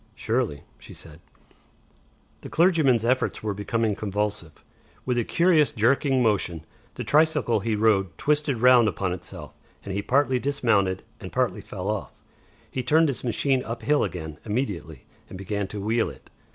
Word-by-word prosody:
"Surely," 110 - -2 0.2
she - - -13
said. 80 -1 -11 1.2
The - - -9
clergyman's 155 - +3
efforts 130 -1 0
were 105 -2 -1
becoming 110 +2 -1
convulsive. 105 -5 -4 0.4
With 125 - 0
a - - +1
curious 165 +1 +3
jerking 130 +2 +2
motion, 90 -7 0 0.3
the - - -4
tricycle 150 -7 +2
he 110 +2 -1
rode 100 -5 +1
twisted 150 -3 0
round 125 -1 +6
upon 95 -3 -1
itself, 90 - -9 0.3
and 95 - -5
he 100 - -1
partly 130 +2 +2
dismounted 110 -9 +1 0.2
and - - -8
partly - - 0
fell - - -7
off. - - -3 0.6
He 130 - -2
turned 155 +5 +3
his 135 - -4
machine 130 +2 +1
up 115 +1 -6
hill 150 0 +2
again 80 -5 -5
immediately 100 - -4 0.2
and - - -8
began 100 +1 -3
to 105 - -7
wheel 110 +3 0
it. - - -15
115 Hz, 155 wpm, -25 LUFS, 100-130 Hz, 1.2 s, round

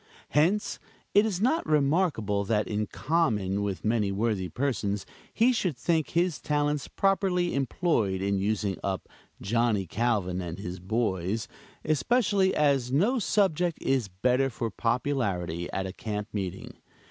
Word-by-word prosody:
Hence, 175 +8 +1 0.3
it 205 +2 +5
is 190 -5 -2
not 260 +10 +2
remarkable 140 - +2
that 105 0 +1
in 105 -1 -1
common 105 - 0
with 100 -1 -3
many 105 -2 +1
worthy 100 -3 -1
persons, 105 - -1 0.3
he 240 +3 +3
should 180 - -1
think 160 +2 0
his 170 -3 0
talents 145 -1 0
properly 190 -3 +1
employed 130 - 0
in 100 0 0
using 100 -1 -1
up 95 -1 -2 0.3
"Johnny 110 -1 +1
Calvin 100 -3 0
and 85 -1 -5
his 90 -2 -6
boys," 100 0 -1 0.4
especially 190 - +2
as 140 -4 +2
no 205 - +2
subject 180 -4 +1
is 130 -5 0
better 125 +8 +1
for 115 -2 -3
popularity 100 - -1
at 95 - -2
a 95 - -5
camp 105 0 -4
meeting. 95 -2 -4
120 Hz, 135 wpm, -28 LUFS, 100-160 Hz, 0.4 s, it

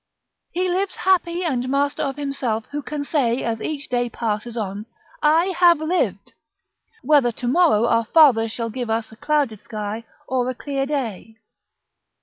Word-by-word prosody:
["He 365 +2 0
lives 370 +2 -1
happy 360 -1 +1
and 255 -6 -1
master 280 +1 0
of 275 -2 -2
himself 275 -6 -2
who 295 +1 -3
can 290 0 -5
say 260 -6 0
as 225 -1 -2
each 290 -2 -4
day 245 -1 0
passes 225 +1 -3
on, 205 0 -4 0.3
'I 330 +5 +3
HAVE 345 -2 +6
LIVED:' 345 +4 -1 0.7
whether 285 -5 +4
to 245 - -5
morrow 265 -6 +4
our 230 -1 +2
Father 240 -5 +5
shall 230 0 -4
give 245 0 -4
us 225 0 -1
a - - -12
clouded 280 -4 0
sky 215 +1 -5 0.2
or 255 -1 0
a 255 - -3
clear 275 +1 -3
day." 230 -7 -4
260 Hz, 160 wpm, -22 LUFS, 230-300 Hz, 0.7 s, HAVE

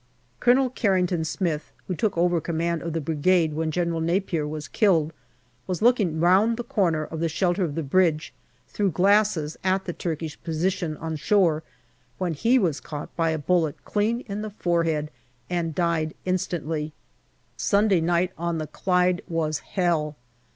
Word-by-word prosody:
Colonel 250 +1 +4
Carrington 185 -8 +1
Smith, 160 -2 -2 0.2
who 185 - -1
took 200 +1 -1
over 175 -1 +2
command 170 +1 -1
of 165 -1 -4
the 165 - 0
Brigade 160 +2 +2
when 160 +1 -1
General 170 0 -1
Napier 170 -2 0
was 150 -1 -5
killed, 165 -5 +2 0.5
was 185 +1 -2
looking 210 -10 +3
round 195 +7 +4
the 240 - -3
corner 170 -9 0
of 160 - -6
the 165 0 0
shelter 180 +3 +1
of 150 -5 -2
the 165 - -2
bridge 160 +1 +1 0.3
through 205 -2 0
glasses 185 -3 +2
at 190 +1 +1
the 175 - -3
Turkish 160 -2 -4
position 165 -1 -1
on 160 0 -4
shore 170 -3 +2 0.6
when 180 -3 -1
he 230 - +3
was 170 - +1
caught 150 -1 -8
by 165 -1 +1
a 160 - 0
bullet 160 -1 0
clean 220 +3 0
in 205 -3 -5
the 215 - -4
forehead 165 -6 0 0.4
and 165 -3 -1
died 170 -3 0
instantly. 165 -4 -2 0.6
Sunday 200 -4 +2
night 175 +2 +1
on 170 -1 -1
the 155 - -3
Clyde 180 +2 +1
was 160 -3 -1
hell. 165 -5 -1
170 Hz, 160 wpm, -25 LUFS, 160-190 Hz, 0.6 s, Colonel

